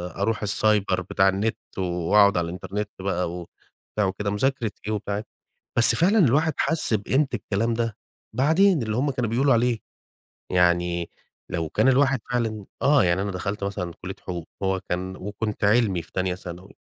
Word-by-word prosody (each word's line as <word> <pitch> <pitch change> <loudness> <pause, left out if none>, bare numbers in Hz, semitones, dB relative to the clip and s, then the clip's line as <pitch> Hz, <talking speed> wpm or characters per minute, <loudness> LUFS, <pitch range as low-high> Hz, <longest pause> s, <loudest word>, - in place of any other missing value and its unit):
أروح 105 +2 -1
السايبر 100 -2 +2
بتاع 95 +1 +2
النت 100 +4 -1 0.2
وأقعد 95 +2 +3
على 85 - +1
الإنترنت 100 +4 -4
بقى 90 -3 -1
وبتاع 90 +3 -6
وكده، 100 +2 -2
مذاكرة 120 0 0 0.2
إيه 110 - 0
وبتاع 100 -1 -3
إيه." 105 - -4 0.5
بس 120 0 +7
فعلًا 200 +6 +4
الواحد 155 +1 +3
حس 150 -6 0
بقيمة 130 +8 +1
الكلام 110 +1 -1
ده 115 -2 -2 0.4
بعدين، 160 - +3
اللي 110 -1 -2
هم 140 +2 +1
كانوا 125 -4 -2
بيقولوا 135 +4 +3
عليه. 120 -1 +2 0.7
يعني 85 -1 +2 0.4
لو 80 -2 -2
كان 130 - +2
الواحد 135 0 +3
فعلًا 110 -4 -1 0.2
آه، 145 0 +4
يعني 90 +1 +2
أنا 100 0 -2
دخلت 100 +3 -4
مثلًا 90 -4 -3
كلية 95 +2 -6
حقوق، 85 -3 -6 0.2
هو 95 0 +1
كان 95 +1 -3
وكنت 105 +3 -5
علمي 105 -4 +3
في - - -19
تانية 95 -1 -1
ثانوي 90 0 -10
105 Hz, 165 wpm, -24 LUFS, 95-120 Hz, 0.7 s, بس